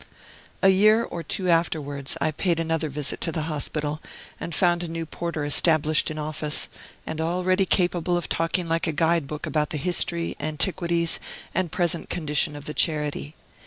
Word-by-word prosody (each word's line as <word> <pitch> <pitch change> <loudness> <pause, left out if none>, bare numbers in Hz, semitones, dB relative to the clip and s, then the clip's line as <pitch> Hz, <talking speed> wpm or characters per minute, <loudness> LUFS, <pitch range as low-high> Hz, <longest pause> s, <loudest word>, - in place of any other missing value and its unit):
A 195 - +8
year 215 +4 +5
or 175 - -5
two 185 +2 -2
afterwards 150 -5 0
I 155 - +1
paid 170 +2 0
another 165 -1 0
visit 145 0 -3
to 165 - 0
the 160 -2 -2
hospital, 150 0 -2 0.4
and 170 - -4
found 175 -1 +3
a 175 - -3
new 165 0 -4
porter 160 -2 -3
established 155 +1 +3
in 155 - -5
office, 150 0 -2 0.4
and 160 0 -3
already 185 +3 +1
capable 175 -1 +2
of 175 - -3
talking 165 +1 0
like 165 +1 +1
a 160 - 0
guide 165 -1 +2
book 150 +1 -5
about 150 -1 0
the 155 - -2
history, 170 +2 0
antiquities, 170 +2 +1 0.3
and 185 -3 0
present 175 -2 0
condition 150 -3 0
of 145 -1 -9
the 150 - -4
charity. 150 -1 0
165 Hz, 170 wpm, -25 LUFS, 150-175 Hz, 0.4 s, A